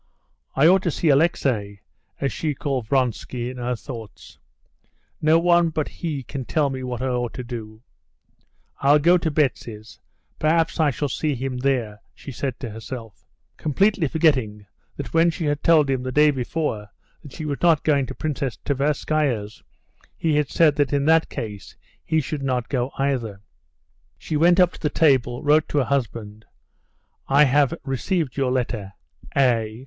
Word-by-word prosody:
"I 135 - +4
ought 185 +3 +6
to 180 - -1
see 160 +1 0
Alexey" 130 -9 +1 0.4
(so 140 - 0
she 150 +3 -2
called 130 -5 -3
Vronsky 125 -1 -1
in 130 - -10
her 125 0 -2
thoughts); 115 -5 -10 0.8
"no 155 +1 +5
one 175 0 +3
but 155 -2 -2
he 155 -6 -5
can 135 +1 -6
tell 145 +1 0
me 130 -1 -5
what 125 -1 -4
I - - 0
ought 125 -1 -2
to 125 - -5
do. 115 -2 -8 1.0
I'll 140 +2 +5
go 175 +4 +4
to 165 - -1
Betsy's, 120 -7 -2 0.4
perhaps 165 +2 +1
I 155 -2 +4
shall 145 +2 -2
see 150 +2 -1
him 130 0 -4
there," 125 -5 -1
she 140 - -9
said 130 0 -4
to 120 - -4
herself, 115 0 -9 0.3
completely 185 +3 +1
forgetting 130 -10 +1 0.3
that - - -6
when 165 +1 +4
she 165 0 -3
had 145 0 -1
told 160 -3 +4
him 135 -2 0
the 130 0 -4
day 150 +3 +5
before 125 -5 -3 0.3
that 140 - -13
she 155 - -6
was 145 -2 -3
not 165 -4 +4
going 140 -4 +2
to - - -7
Princess 140 -5 -3
Tverskaya's, 140 -5 -1 0.6
he 160 -2 0
had 150 -2 +1
said 155 -4 +3
that 145 -2 +1
in 140 0 +1
that 160 +1 +4
case 105 -3 -7 0.3
he 160 - +1
should 150 +1 -5
not 125 -3 -1
go 125 -2 -1
either. 125 -7 -1 0.8
She 155 - -5
went 175 +4 +4
up 180 -1 +5
to - - -12
the 150 - +1
table, 130 -7 +2
wrote 150 +1 +3
to - - -2
her 140 - +4
husband, 110 -4 -3 0.8
"I 140 +2 +5
have 145 +2 +3
received 140 +2 -1
your 135 -2 0
letter.—A." 110 - -2
135 Hz, 170 wpm, -23 LUFS, 120-155 Hz, 1.0 s, ought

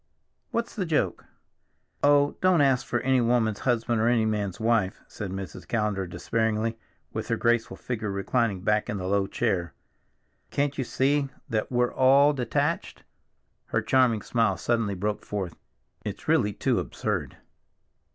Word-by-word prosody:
What's 235 0 -2
the 190 -5 -2
joke?" 155 -2 0 0.8
"Oh, 145 0 +4
don't 185 -4 +4
ask 135 -2 +2
for 120 - 0
any 130 -1 +3
woman's 115 -3 +1
husband 120 -2 +1
or 115 - +3
any 120 -2 +3
man's 105 -4 -2
wife," 110 -4 +1
said 100 -3 -6
Mrs. 95 0 -7
Callender 105 -4 -1
despairingly, 110 +4 -1 0.4
with - - -4
her - - 0
graceful 120 -1 +1
figure 110 -4 -4
reclining 100 0 0
back 105 +2 +1
in 105 - -2
the 90 - -4
low 100 +1 +1
chair. 90 - -1 0.7
"Can't 140 0 0
you 135 - -1
see 135 +3 +1 0.2
that 110 0 -1
we're 125 0 +1
all 140 +3 +5
detached?" 125 -4 -1 0.6
Her - - -1
charming 125 -5 +3
smile 115 -6 +1
suddenly 115 -1 0
broke 105 +3 -2
forth. 95 -5 -4 0.5
"It's - - -6
really 105 0 +3
too - - +1
absurd." - - -3
115 Hz, 150 wpm, -26 LUFS, 105-130 Hz, 0.8 s, all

